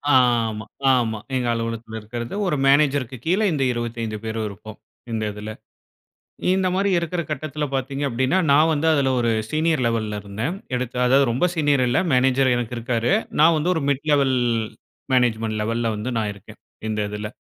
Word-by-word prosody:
ஆமா, 115 Hz, -4 st, +2 dB, 0.3 s
ஆமா. 110 Hz, -3 st, 0 dB, 0.2 s
எங்க 125 Hz, -2 st, 0 dB
அலுவலகத்துல 115 Hz, -1 st, -4 dB
இருக்குறது 120 Hz, -, -6 dB
ஒரு 160 Hz, -, +1 dB
மேனேஜர்‌க்கு 140 Hz, -3 st, +2 dB
கீழ 185 Hz, +5 st, +2 dB
இந்த 140 Hz, -2 st, 0 dB
25 115 Hz, -2 st, -4 dB
பேர் 110 Hz, 0 st, -4 dB
இருப்போம், 105 Hz, +1 st, -10 dB, 0.3 s
இந்ததுல. 105 Hz, -1 st, -3 dB, 1.0 s
இந்த 190 Hz, -1 st, +1 dB
மாரி 195 Hz, +1 st, +1 dB
இருக்குற 170 Hz, +1 st, -2 dB
கட்டத்துல 150 Hz, +1 st, -3 dB
பாத்தீங்க 135 Hz, +2 st, -2 dB
அப்டீன்னா, 130 Hz, +8 st, +1 dB
நான் 155 Hz, +3 st, +5 dB
வந்து 155 Hz, +2 st, 0 dB
அதுல 135 Hz, -2 st, +2 dB
ஒரு 115 Hz, -1 st, +1 dB, 0.2 s
சீனியர் 155 Hz, -3 st, +1 dB
லெவல்‌ல 110 Hz, -2 st, -1 dB
இருந்தேன். 110 Hz, -, -4 dB, 0.2 s
எடுத்த 125 Hz, -1 st, -3 dB
அதாவது, 135 Hz, +2 st, +5 dB
ரொம்ப 135 Hz, +9 st, +2 dB
சீனியர் 145 Hz, -4 st, +2 dB
இல்ல. 125 Hz, -, +2 dB
மேனேஜர் 130 Hz, 0 st, +3 dB
எனக்கு 120 Hz, 0 st, -3 dB
இருக்காரு. 115 Hz, +4 st, 0 dB, 0.3 s
நான் 165 Hz, +1 st, +6 dB
வந்து 160 Hz, +4 st, 0 dB
ஒரு 160 Hz, -, -1 dB
மிட் 140 Hz, +1 st, 0 dB
லெவல் 135 Hz, -3 st, +3 dB, 0.8 s
மேனேஜ்மென்ட் 110 Hz, -3 st, +1 dB
லெவல்‌ல 115 Hz, +1 st, -1 dB
வந்து 115 Hz, +5 st, -3 dB
நான் 105 Hz, -2 st, -1 dB
இருக்கேன். 105 Hz, +2 st, -15 dB, 0.3 s
இந்ததுல. 105 Hz, 0 st, -3 dB
125 Hz, 155 wpm, -22 LUFS, 110-145 Hz, 1.0 s, நான்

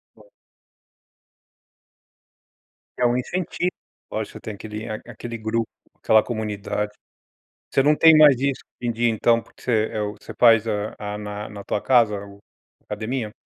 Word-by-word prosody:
Boa. -, -, -20 dB, 2.7 s
É 125 Hz, -, +3 dB
um 120 Hz, +1 st, +2 dB
incentivo, 180 Hz, +6 st, -2 dB, 0.4 s
lógico. -, -, -4 dB
Você -, -, -9 dB
tem 110 Hz, -, -6 dB
aquele 105 Hz, +1 st, -7 dB, 0.2 s
aquele 115 Hz, 0 st, -7 dB
grupo, 110 Hz, +1 st, -1 dB, 0.3 s
aquela 110 Hz, 0 st, +5 dB
comunidade. 105 Hz, -2 st, -3 dB, 0.8 s
Você 135 Hz, -, +3 dB
não 150 Hz, +2 st, +4 dB
tem 160 Hz, -1 st, +7 dB
mais 150 Hz, -4 st, +8 dB
isso, 140 Hz, -1 st, 0 dB, 0.2 s
de 120 Hz, -1 st, -1 dB
de 115 Hz, +1 st, -6 dB
ir 120 Hz, -, +6 dB
então 115 Hz, +1 st, +2 dB
porque -, -, -21 dB
você, 125 Hz, -, -1 dB, 0.2 s
eh, 110 Hz, -, -2 dB, 0.2 s
você -, -, -10 dB
faz 115 Hz, -2 st, +6 dB
a 105 Hz, 0 st, -2 dB
a 105 Hz, 0 st, -5 dB
na 105 Hz, 0 st, -6 dB
na 100 Hz, -1 st, -9 dB
tua 105 Hz, -, -1 dB
casa 115 Hz, -5 st, +4 dB
o 100 Hz, 0 st, -13 dB, 0.5 s
academia? 110 Hz, +1 st, -4 dB
115 Hz, 150 wpm, -23 LUFS, 105-125 Hz, 2.7 s, mais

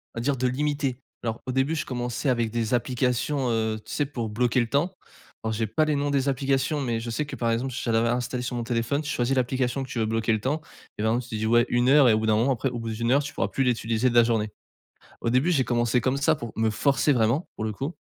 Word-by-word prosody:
on -, -, -3 dB
va -, -, -2 dB
dire 135 Hz, +1 st, 0 dB
de 130 Hz, +1 st, +1 dB
limiter. 140 Hz, -1 st, -1 dB, 0.2 s
Alors 115 Hz, -1 st, -3 dB
au 130 Hz, -, -2 dB
début, 135 Hz, +5 st, +1 dB
je 150 Hz, -, -2 dB
commençais 125 Hz, +2 st, -2 dB
avec 115 Hz, -3 st, +1 dB
des 115 Hz, 0 st, -1 dB
applications, 125 Hz, +2 st, 0 dB
heu, 110 Hz, -1 st, 0 dB
tu -, -, -10 dB
sais 145 Hz, -, +1 dB
pour 120 Hz, -6 st, -4 dB
bloquer 120 Hz, +3 st, +1 dB
le 120 Hz, -, +1 dB
temps. 145 Hz, +8 st, +1 dB, 0.5 s
Alors 110 Hz, 0 st, -1 dB
j'ai 110 Hz, 0 st, -1 dB
pas 155 Hz, +9 st, +1 dB
les 150 Hz, -1 st, +1 dB
noms 145 Hz, 0 st, 0 dB
des 140 Hz, 0 st, +1 dB
applications, 135 Hz, +2 st, 0 dB
mais 120 Hz, -3 st, -1 dB
je 115 Hz, +1 st, -5 dB
sais 150 Hz, +6 st, -2 dB
que 145 Hz, -, -7 dB
par 115 Hz, -1 st, -1 dB
exemple, 125 Hz, +2 st, -1 dB
j'en 115 Hz, -, 0 dB
avais 115 Hz, +1 st, +3 dB
installé 125 Hz, +1 st, -1 dB
sur 125 Hz, 0 st, -3 dB
mon 120 Hz, -, -2 dB
téléphone. 120 Hz, +5 st, -1 dB
Tu 150 Hz, -, -6 dB
choisis 125 Hz, +2 st, 0 dB
l'application 130 Hz, +1 st, 0 dB
que 130 Hz, -, -9 dB
tu 120 Hz, -, -3 dB
veux 110 Hz, -, +2 dB
bloquer 115 Hz, 0 st, 0 dB
le 110 Hz, -, 0 dB
temps 150 Hz, +4 st, -1 dB, 0.4 s
et 105 Hz, -, -2 dB
par 110 Hz, +1 st, +2 dB
exemple 120 Hz, 0 st, -2 dB
tu 110 Hz, -, -3 dB
dis 110 Hz, -, -2 dB
ouais 120 Hz, +2 st, +4 dB
1 120 Hz, +1 st, +2 dB
heure 140 Hz, -3 st, +7 dB
et -, -, +5 dB
au 110 Hz, -, +2 dB
bout 110 Hz, -, -2 dB
d'un 110 Hz, -, +4 dB
moment 120 Hz, +5 st, +2 dB
après 130 Hz, +2 st, -1 dB
au 120 Hz, -1 st, -5 dB
bout 115 Hz, 0 st, -4 dB
d'1 115 Hz, +2 st, -1 dB
heure, 140 Hz, +2 st, +4 dB
tu 145 Hz, -, -7 dB
pourras -, -, 0 dB
plus 135 Hz, -, 0 dB
l'utiliser 115 Hz, 0 st, +1 dB
de 120 Hz, -, -3 dB
la 120 Hz, -, +8 dB
journée. 110 Hz, -2 st, 0 dB, 0.7 s
Au 115 Hz, -, 0 dB
début, 130 Hz, +9 st, +2 dB
j'ai 135 Hz, -6 st, +3 dB
commencé 120 Hz, 0 st, +1 dB
comme 130 Hz, +3 st, 0 dB
ça, 155 Hz, +3 st, +3 dB
pour 120 Hz, -6 st, -7 dB
me 110 Hz, 0 st, +2 dB
forcer 140 Hz, +5 st, +2 dB
vraiment 120 Hz, +7 st, +1 dB
pour 110 Hz, -, -3 dB
le 110 Hz, -, -1 dB
coup, 140 Hz, -, -4 dB
125 Hz, 285 wpm, -26 LUFS, 115-135 Hz, 0.7 s, la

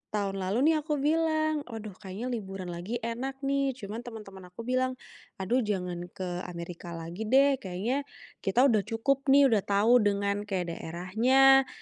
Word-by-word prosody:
tahun 195 Hz, -1 st, -1 dB
lalu 230 Hz, +12 st, +2 dB
nih -, -, +2 dB
aku 300 Hz, 0 st, -2 dB
bilang, 310 Hz, +1 st, +1 dB
"Aduh, 220 Hz, -3 st, -7 dB
kayaknya 215 Hz, +6 st, -5 dB
liburan 195 Hz, -5 st, -5 dB
lagi 175 Hz, +7 st, -5 dB
enak 265 Hz, +4 st, -4 dB
nih", 275 Hz, -1 st, +1 dB
cuma 215 Hz, -2 st, -6 dB
teman-teman 210 Hz, -6 st, -10 dB
aku 180 Hz, +6 st, -9 dB
bilang, 255 Hz, +1 st, 0 dB, 0.4 s
"Aduh, 200 Hz, +7 st, 0 dB
jangan 180 Hz, -5 st, -2 dB
ke 180 Hz, -1 st, -5 dB
Amerika 170 Hz, 0 st, -7 dB
lagi 170 Hz, +6 st, -6 dB
deh, 270 Hz, +2 st, +4 dB
kayaknya 220 Hz, +9 st, -2 dB, 0.3 s
kita 195 Hz, +6 st, +2 dB
udah 235 Hz, -6 st, +5 dB
cukup 270 Hz, +5 st, 0 dB
nih, 275 Hz, -1 st, +6 dB
udah 215 Hz, -, +4 dB
tau 215 Hz, +5 st, +4 dB
dengan 200 Hz, -1 st, 0 dB
kayak 180 Hz, -4 st, -2 dB
daerahnya, 245 Hz, +12 st, +3 dB
220 Hz, 155 wpm, -29 LUFS, 190-265 Hz, 0.4 s, nih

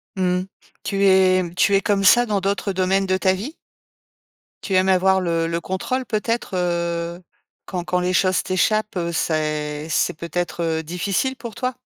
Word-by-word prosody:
Mmh 190 Hz, -, -3 dB, 0.2 s
mh. -, -, -7 dB, 0.4 s
Tu 200 Hz, 0 st, 0 dB
es 190 Hz, -1 st, +4 dB
tu 200 Hz, -, +3 dB
es 195 Hz, -, +3 dB
comme 200 Hz, -1 st, +1 dB
ça 240 Hz, +5 st, +6 dB
dans 205 Hz, -2 st, 0 dB
d'autres 200 Hz, +1 st, -1 dB
domaines 190 Hz, +1 st, +1 dB
de 185 Hz, 0 st, +2 dB
ta 190 Hz, 0 st, +2 dB
vie? 220 Hz, -, -5 dB, 1.1 s
Tu 195 Hz, -, -1 dB
aimes 185 Hz, +1 st, +3 dB
avoir 190 Hz, 0 st, +3 dB
le 165 Hz, -2 st, 0 dB
le 165 Hz, 0 st, -1 dB
contrôle 190 Hz, +9 st, -3 dB
peut-être? 230 Hz, +1 st, -2 dB
Heu, 170 Hz, -1 st, -2 dB, 0.5 s
quand 180 Hz, -2 st, -4 dB
quand 180 Hz, +1 st, 0 dB
les 180 Hz, +1 st, -1 dB
choses 185 Hz, 0 st, +2 dB
t'échappent, 215 Hz, +3 st, 0 dB
heu, 170 Hz, -2 st, -2 dB
c'est 155 Hz, -2 st, -2 dB
c'est -, -, +1 dB
peut-être, 170 Hz, +2 st, -4 dB
heu, 160 Hz, -1 st, -1 dB
difficile 190 Hz, +10 st, -1 dB
pour 235 Hz, -3 st, -8 dB
toi? 255 Hz, +3 st, -3 dB
185 Hz, 175 wpm, -21 LUFS, 170-200 Hz, 1.1 s, ça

